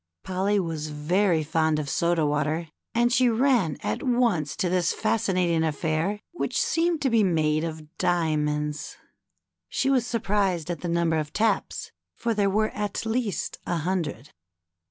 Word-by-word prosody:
Polly 195 Hz, +2 st, +1 dB
was 160 Hz, -4 st, -3 dB
very 165 Hz, +3 st, +1 dB
fond 160 Hz, 0 st, +1 dB
of 150 Hz, -2 st, -3 dB
soda 170 Hz, +2 st, +1 dB
water, 150 Hz, +3 st, 0 dB, 0.3 s
and 240 Hz, +1 st, +3 dB
she 250 Hz, 0 st, +4 dB
ran 230 Hz, -, +2 dB
at 105 Hz, -, -2 dB
once 235 Hz, -, +1 dB
to 185 Hz, -, 0 dB
this 180 Hz, -1 st, +1 dB
fascinating 180 Hz, -6 st, +1 dB
affair, 160 Hz, +5 st, -1 dB
which 350 Hz, -, -2 dB
seemed 330 Hz, -1 st, +1 dB
to 270 Hz, -, +3 dB
be 225 Hz, -2 st, +4 dB
made 155 Hz, -4 st, +2 dB
of 160 Hz, 0 st, -6 dB
diamonds. 150 Hz, -3 st, 0 dB, 0.7 s
She 270 Hz, -, +1 dB
was 250 Hz, -3 st, +2 dB
sur 235 Hz, -, 0 dB
prised 195 Hz, -6 st, 0 dB
at 170 Hz, -, -5 dB
the 175 Hz, -, -3 dB
number 170 Hz, -1 st, +1 dB
of 150 Hz, -1 st, -5 dB
taps, 220 Hz, +1 st, 0 dB, 0.2 s
for 235 Hz, -1 st, -1 dB
there 205 Hz, -2 st, +2 dB
were 215 Hz, +2 st, +1 dB
at 210 Hz, +1 st, -3 dB
least 220 Hz, -5 st, -2 dB
a 175 Hz, -, 0 dB
hundred. 160 Hz, -5 st, -3 dB
175 Hz, 155 wpm, -26 LUFS, 155-210 Hz, 0.7 s, she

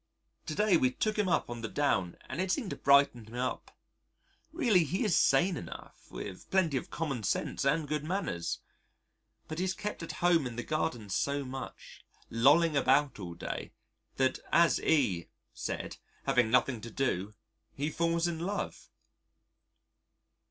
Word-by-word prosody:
To 155 Hz, -, -3 dB
day 210 Hz, -3 st, +4 dB
we 130 Hz, -, +3 dB
took 215 Hz, +11 st, -1 dB
him 210 Hz, -3 st, +1 dB
up 170 Hz, -, +2 dB
on 120 Hz, -1 st, -6 dB
the 115 Hz, -, -3 dB
Down 95 Hz, -13 st, 0 dB
and 145 Hz, +7 st, -3 dB
it 190 Hz, 0 st, 0 dB
seemed 235 Hz, -7 st, -1 dB
to -, -, -3 dB
brighten 140 Hz, -4 st, +4 dB
him 115 Hz, -, -10 dB
up. 125 Hz, +1 st, -3 dB, 0.7 s
Really, 240 Hz, -, +3 dB
he 180 Hz, -, -1 dB
is 205 Hz, -, +3 dB
sane 180 Hz, +1 st, +4 dB
enough, 85 Hz, -, -9 dB
with 95 Hz, -2 st, -8 dB
plenty 185 Hz, -7 st, +2 dB
of 130 Hz, -, -2 dB
commonsense 135 Hz, -, -2 dB
and 150 Hz, +2 st, +2 dB
good 150 Hz, 0 st, -1 dB
manners. 155 Hz, -, -2 dB, 0.9 s
But 155 Hz, +1 st, -5 dB
he -, -, +1 dB
is 190 Hz, 0 st, -1 dB
kept 210 Hz, -3 st, -4 dB
at 165 Hz, -2 st, -5 dB
home 165 Hz, -2 st, +3 dB
in 120 Hz, -, -7 dB
the 120 Hz, -, -3 dB
garden 140 Hz, -9 st, -2 dB
so 140 Hz, +6 st, 0 dB
much, 130 Hz, +1 st, -8 dB, 0.3 s
lolling 150 Hz, +7 st, +5 dB
about 135 Hz, -1 st, +3 dB
all 85 Hz, -3 st, -6 dB
day, -, -, -5 dB, 0.4 s
that 130 Hz, 0 st, +1 dB
as 170 Hz, -1 st, +4 dB
E 105 Hz, -, +2 dB, 0.3 s
said, -, -, -4 dB, 0.3 s
having 120 Hz, -3 st, +3 dB
nothing 125 Hz, 0 st, +2 dB
to 115 Hz, -, -7 dB
do, 105 Hz, -5 st, -1 dB, 0.4 s
he 145 Hz, +3 st, -2 dB
falls 170 Hz, +1 st, +1 dB
in 170 Hz, -2 st, -3 dB
love. 195 Hz, +5 st, -4 dB
145 Hz, 160 wpm, -31 LUFS, 120-170 Hz, 0.9 s, lolling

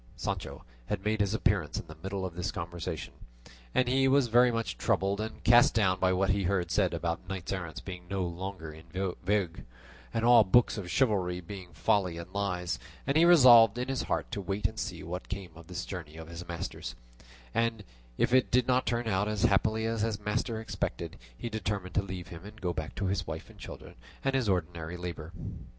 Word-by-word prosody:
Sancho -, -, -4 dB, 0.2 s
had 100 Hz, -1 st, -3 dB
made 110 Hz, 0 st, +1 dB
his 100 Hz, +1 st, +1 dB
appearance 105 Hz, -9 st, +1 dB
in -, -, -8 dB
the -, -, -11 dB
middle 95 Hz, 0 st, -3 dB
of 90 Hz, -, -5 dB
this 90 Hz, +1 st, -2 dB
conversation, 85 Hz, -1 st, -5 dB, 0.6 s
and 130 Hz, -, +3 dB
he 135 Hz, +2 st, +3 dB
was 135 Hz, -2 st, +4 dB
very 120 Hz, +2 st, +6 dB
much 115 Hz, -1 st, -2 dB
troubled 100 Hz, -2 st, +1 dB
and 110 Hz, 0 st, -6 dB
cast 120 Hz, 0 st, +6 dB
down 95 Hz, -4 st, +3 dB
by 95 Hz, 0 st, +3 dB
what 95 Hz, +1 st, +2 dB
he 100 Hz, -1 st, 0 dB
heard 90 Hz, -2 st, 0 dB
said -, -, +3 dB
about 85 Hz, +2 st, -3 dB
knights 95 Hz, -2 st, -4 dB
errant 90 Hz, -4 st, -5 dB
being 90 Hz, -2 st, -7 dB
now 100 Hz, -, -3 dB
no 95 Hz, -, 0 dB
longer 85 Hz, -2 st, -5 dB
in 80 Hz, +1 st, -13 dB, 0.4 s
vogue, 95 Hz, -3 st, 0 dB, 0.5 s
and 115 Hz, 0 st, 0 dB
all 120 Hz, -2 st, +8 dB
books 115 Hz, +5 st, +4 dB
of 100 Hz, -5 st, -5 dB
chivalry 95 Hz, -7 st, +1 dB
being 90 Hz, 0 st, -9 dB
folly 90 Hz, -5 st, +1 dB
and 85 Hz, +2 st, -8 dB
lies; 90 Hz, -5 st, -1 dB, 0.3 s
and 140 Hz, -, 0 dB
he 165 Hz, +2 st, +6 dB
resolved 120 Hz, -10 st, +8 dB
in 125 Hz, +2 st, -2 dB
his 135 Hz, -1 st, 0 dB
heart -, -, -2 dB
to 100 Hz, -, -3 dB
wait 100 Hz, +2 st, -3 dB
and 110 Hz, +2 st, 0 dB
see -, -, -4 dB
what 90 Hz, +2 st, -6 dB
came 100 Hz, -3 st, -5 dB
of 85 Hz, 0 st, -13 dB
this 90 Hz, 0 st, -4 dB
journey 85 Hz, -5 st, -7 dB
of 80 Hz, 0 st, -9 dB
his 85 Hz, +1 st, -8 dB
master's, 85 Hz, -1 st, -5 dB, 0.6 s
and 115 Hz, -2 st, 0 dB, 0.3 s
if 125 Hz, -, +2 dB
it 130 Hz, -1 st, +5 dB
did 125 Hz, 0 st, +3 dB
not 130 Hz, 0 st, +2 dB
turn 120 Hz, -1 st, 0 dB
out 105 Hz, -1 st, +1 dB
as 105 Hz, -3 st, -1 dB
happily 110 Hz, +3 st, +3 dB
as 115 Hz, -1 st, -1 dB
his 110 Hz, -2 st, 0 dB
master 110 Hz, +1 st, -1 dB
expected, 110 Hz, -, -4 dB, 0.2 s
he -, -, -4 dB
determined 100 Hz, -4 st, -3 dB
to 105 Hz, -, +3 dB
leave 95 Hz, -2 st, -7 dB
him 85 Hz, 0 st, -9 dB
and 105 Hz, +2 st, -11 dB
go 90 Hz, -4 st, -1 dB
back 80 Hz, -1 st, -5 dB
to 100 Hz, -, -2 dB
his 95 Hz, 0 st, -1 dB
wife 80 Hz, 0 st, -6 dB
and -, -, -19 dB
children -, -, -9 dB, 0.3 s
and 135 Hz, -, +2 dB
his 130 Hz, -5 st, +1 dB
ordinary 85 Hz, -2 st, -1 dB
labour. 85 Hz, -2 st, -6 dB
100 Hz, 210 wpm, -30 LUFS, 90-110 Hz, 0.6 s, all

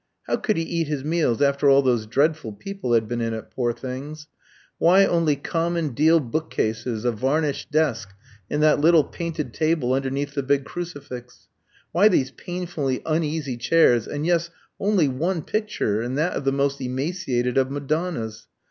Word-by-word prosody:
How -, -, 0 dB
could 215 Hz, -5 st, -1 dB
he 165 Hz, -, 0 dB
eat 165 Hz, -1 st, -2 dB
his 145 Hz, -3 st, -3 dB
meals 150 Hz, -5 st, +1 dB
after 140 Hz, 0 st, +3 dB
all 140 Hz, 0 st, +6 dB
those 120 Hz, -4 st, +1 dB
dreadful 140 Hz, -1 st, +1 dB
people 195 Hz, -, -4 dB
had 110 Hz, -2 st, +3 dB
been 120 Hz, +1 st, -2 dB
in 115 Hz, -1 st, -1 dB
it, 110 Hz, -, -9 dB
poor 120 Hz, -2 st, 0 dB
things? 135 Hz, +5 st, -7 dB, 0.5 s
Why 190 Hz, +4 st, +6 dB
only 165 Hz, -5 st, +2 dB
common 165 Hz, +2 st, -1 dB
deal 155 Hz, +6 st, +4 dB
book 155 Hz, +4 st, -3 dB
cases, 110 Hz, +1 st, -2 dB
a 120 Hz, -, +3 dB
varnished 140 Hz, +6 st, -1 dB
desk, 140 Hz, -9 st, 0 dB, 0.4 s
and 150 Hz, +1 st, 0 dB
that 150 Hz, -1 st, +4 dB
little 165 Hz, 0 st, +6 dB
painted 155 Hz, -8 st, -5 dB
table 155 Hz, -6 st, +1 dB
underneath 135 Hz, +2 st, -2 dB
the 140 Hz, -, -1 dB
big 140 Hz, 0 st, +1 dB
crucifix? 145 Hz, -8 st, -8 dB, 0.4 s
Why 185 Hz, +6 st, +5 dB
these 135 Hz, -10 st, +2 dB
painfully 170 Hz, -7 st, -4 dB
uneasy 155 Hz, -4 st, -1 dB
chairs, 120 Hz, -3 st, +3 dB
and 145 Hz, +1 st, -3 dB
yes 170 Hz, 0 st, +1 dB, 0.3 s
only 195 Hz, -6 st, +2 dB
one 160 Hz, +6 st, -1 dB
picture, 210 Hz, -, -1 dB
and 125 Hz, +3 st, -3 dB
that 160 Hz, +4 st, +1 dB
of 140 Hz, -, -4 dB
the 135 Hz, -, +3 dB
most 140 Hz, 0 st, 0 dB
emaciated 130 Hz, -2 st, -1 dB
of 130 Hz, 0 st, +1 dB
Madonnas? 140 Hz, -6 st, -3 dB
145 Hz, 170 wpm, -23 LUFS, 125-165 Hz, 0.5 s, all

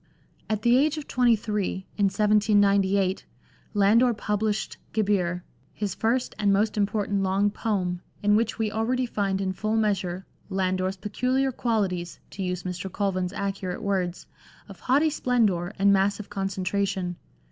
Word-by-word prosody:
At 215 Hz, -1 st, -1 dB
the 240 Hz, +1 st, +5 dB
age 305 Hz, +3 st, +2 dB
of 300 Hz, -, -6 dB
twenty 245 Hz, -2 st, +3 dB
three 205 Hz, -3 st, -3 dB
(in 205 Hz, -, +2 dB
1798) 200 Hz, -1 st, +3 dB, 0.5 s
Landor 225 Hz, +4 st, +4 dB
published 210 Hz, 0 st, -2 dB, 0.2 s
Gebir^ 185 Hz, -5 st, +1 dB, 0.3 s
his 205 Hz, -4 st, -3 dB
first 235 Hz, +5 st, 0 dB
and 205 Hz, -1 st, +3 dB
most 210 Hz, +2 st, +2 dB
important 205 Hz, -1 st, 0 dB
long 195 Hz, +2 st, +2 dB
poem, 185 Hz, -5 st, -2 dB, 0.2 s
in 205 Hz, 0 st, +4 dB
which 230 Hz, +2 st, +1 dB
we 220 Hz, -2 st, -1 dB
already 245 Hz, +4 st, 0 dB
find 200 Hz, -4 st, -1 dB
in 190 Hz, -1 st, -1 dB
full 215 Hz, +3 st, -1 dB
measure 190 Hz, -4 st, -1 dB
" -, -, -41 dB
Lander's 185 Hz, 0 st, -1 dB
peculiar 255 Hz, +7 st, 0 dB
qualities," 195 Hz, -8 st, -1 dB
to 195 Hz, -, -7 dB
use 180 Hz, -1 st, -2 dB
Mr. 180 Hz, +1 st, -5 dB
Colvin's 185 Hz, -3 st, -1 dB
accurate 195 Hz, -2 st, -4 dB
words, 185 Hz, -3 st, -1 dB, 0.2 s
" -, -, -25 dB
of 195 Hz, -, -12 dB
haughty 290 Hz, +5 st, +2 dB
splendour 210 Hz, -, +1 dB
and 200 Hz, 0 st, +4 dB
massive 200 Hz, +1 st, 0 dB
concentration." 195 Hz, -2 st, -2 dB
200 Hz, 145 wpm, -26 LUFS, 190-215 Hz, 0.5 s, the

